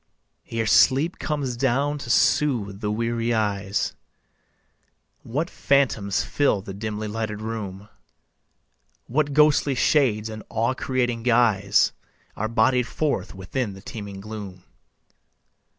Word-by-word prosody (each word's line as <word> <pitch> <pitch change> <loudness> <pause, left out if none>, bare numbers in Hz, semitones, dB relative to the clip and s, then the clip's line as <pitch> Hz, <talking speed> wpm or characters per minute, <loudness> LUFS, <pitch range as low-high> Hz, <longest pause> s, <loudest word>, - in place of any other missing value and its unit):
Ere 115 -1 -1
sleep 140 - +4
comes 145 -5 -2
down 140 +4 0
to 120 - -8
soothe 115 -6 +2
the 105 - -1
weary 115 +2 0
eyes, 100 -2 -1 1.3
What 145 +8 -2
phantoms 125 - +1
fill 135 -9 +1
the 95 - -7
dimly 105 +1 -4
lighted 105 0 -3
room; 105 -3 -5 1.2
What 145 +3 0
ghostly 150 -2 +4
shades 120 -5 +2
in 110 -1 -7
awe 115 +3 0
creating 125 -3 -1
guise 115 -5 +3 0.4
Are 110 - -2
bodied 115 +2 +2
forth 150 -9 -2
within 100 +4 -3
the 95 - -12
teeming 100 -4 -7
gloom. 100 -3 -8
115 Hz, 115 wpm, -24 LUFS, 105-130 Hz, 1.3 s, sleep